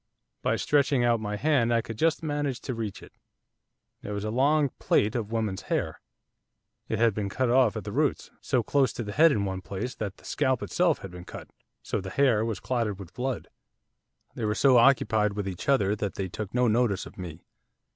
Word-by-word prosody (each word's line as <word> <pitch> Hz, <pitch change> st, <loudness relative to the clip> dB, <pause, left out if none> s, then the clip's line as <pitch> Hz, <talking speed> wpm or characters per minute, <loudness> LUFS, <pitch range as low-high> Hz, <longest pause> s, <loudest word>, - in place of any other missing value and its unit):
By -, -, +1 dB
stretching 140 Hz, -3 st, +2 dB
out 120 Hz, -1 st, +3 dB
my 105 Hz, -1 st, -3 dB
hand, 130 Hz, -2 st, +2 dB
I 115 Hz, -1 st, +2 dB
could 115 Hz, -, -7 dB
just 160 Hz, +7 st, +1 dB
manage 145 Hz, -4 st, -2 dB
to 130 Hz, -, -4 dB
reach 110 Hz, -4 st, -5 dB
it, -, -, -15 dB, 0.9 s
it -, -, -8 dB
was 100 Hz, -1 st, -3 dB
a 110 Hz, -, -2 dB
long 140 Hz, +4 st, +3 dB
plait 105 Hz, +3 st, +2 dB
of 115 Hz, -4 st, -3 dB
woman's 110 Hz, -4 st, -1 dB
hair. -, -, -1 dB, 0.9 s
It 110 Hz, -, 0 dB
had 115 Hz, 0 st, +3 dB
been 100 Hz, -1 st, -3 dB
cut 130 Hz, +3 st, 0 dB
off 125 Hz, -4 st, +4 dB
at -, -, -5 dB
the -, -, -6 dB
roots, -, -, 0 dB
so 125 Hz, -3 st, +1 dB
close 135 Hz, +3 st, +2 dB
to 120 Hz, -, -4 dB
the 105 Hz, -, -5 dB
head 160 Hz, +7 st, +5 dB
in 100 Hz, -6 st, 0 dB
one 95 Hz, -1 st, -3 dB
place 100 Hz, +7 st, -5 dB
that 105 Hz, -5 st, -5 dB
the -, -, -19 dB
scalp 130 Hz, -2 st, 0 dB
itself 175 Hz, -3 st, +1 dB
had 95 Hz, -, -7 dB
been 90 Hz, 0 st, -10 dB
cut, -, -, -9 dB, 0.3 s
so -, -, -2 dB
that 95 Hz, -1 st, -5 dB
the -, -, -11 dB
hair 125 Hz, -6 st, +3 dB
was 110 Hz, -3 st, -2 dB
clotted 115 Hz, -4 st, -1 dB
with 95 Hz, -3 st, -11 dB
blood. 130 Hz, +1 st, -3 dB, 0.9 s
They 115 Hz, -, -3 dB
were 105 Hz, 0 st, 0 dB
so 130 Hz, +1 st, +5 dB
occupied 110 Hz, -4 st, +4 dB
with 100 Hz, -1 st, -3 dB
each 90 Hz, +3 st, -5 dB
other 105 Hz, -7 st, +3 dB
that 100 Hz, -1 st, -3 dB
they 95 Hz, -, -2 dB
took 105 Hz, +1 st, -6 dB
no 125 Hz, 0 st, +2 dB
notice 110 Hz, -3 st, +1 dB
of -, -, -13 dB
me. 85 Hz, -2 st, -8 dB
115 Hz, 215 wpm, -27 LUFS, 100-130 Hz, 0.9 s, head